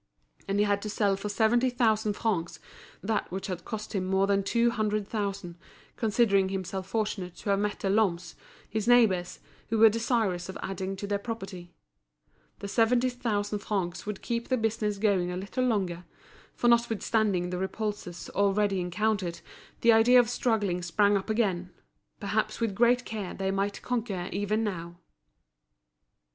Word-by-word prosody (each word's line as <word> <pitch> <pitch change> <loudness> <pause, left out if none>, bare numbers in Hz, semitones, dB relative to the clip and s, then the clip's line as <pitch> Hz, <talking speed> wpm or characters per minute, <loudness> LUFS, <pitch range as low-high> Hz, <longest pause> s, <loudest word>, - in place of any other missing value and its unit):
And 195 +1 0
he 205 - +4
had 200 -1 +1
to 210 - -4
sell 205 -1 +1
for 200 +2 -5
seventy 235 +4 +3
thousand 220 -3 +1
francs 170 -7 -2 0.4
that 215 -2 -1
which 190 +1 -4
had 180 -3 -5
cost 215 -1 -6
him 195 -3 0
more 190 +1 +2
than 200 0 +2
two 235 +4 +2
hundred 215 -3 -1
thousand, 200 -5 -4 0.4
considering 205 -4 +2
himself 190 0 -4
fortunate 200 -5 -2
to 200 - -3
have 195 - +2
met 205 0 -2
the - - -1
Lhommes, 180 -5 +1 0.3
his 220 +1 -3
neighbours, 210 -8 +3 0.3
who 225 - +1
were 220 0 +8
desirous 220 -5 0
of 190 - -6
adding 190 0 -3
to 200 - -6
their 200 0 -1
property. 195 -6 -7 0.9
The 200 - -4
seventy 240 +4 +3
thousand 210 -4 -2
francs 190 -3 -3
would 210 -2 -5
keep 235 -1 -2
the 255 - +1
business 220 -2 -1
going 195 -4 +1
a 180 - -3
little 200 +7 -2
longer; 185 -7 -1 0.5
for 240 - 0
notwithstanding 220 -5 +2
the 180 - -2
repulses 190 -2 -4
already 200 -1 +2
encountered, 185 0 -1 0.4
the 235 - +6
idea 235 +3 +6
of 240 -1 +2
struggling 205 -8 0
sprang 200 +4 +2
up 195 +2 -2
again; 195 -5 0 0.5
perhaps 215 +1 -1
with 230 -4 0
great 240 +4 +3
care 210 -4 -5
they 190 0 -1
might 195 +1 -2
conquer 220 -7 -2
even 205 +3 0
now. 170 -5 -4
205 Hz, 160 wpm, -28 LUFS, 190-225 Hz, 0.9 s, were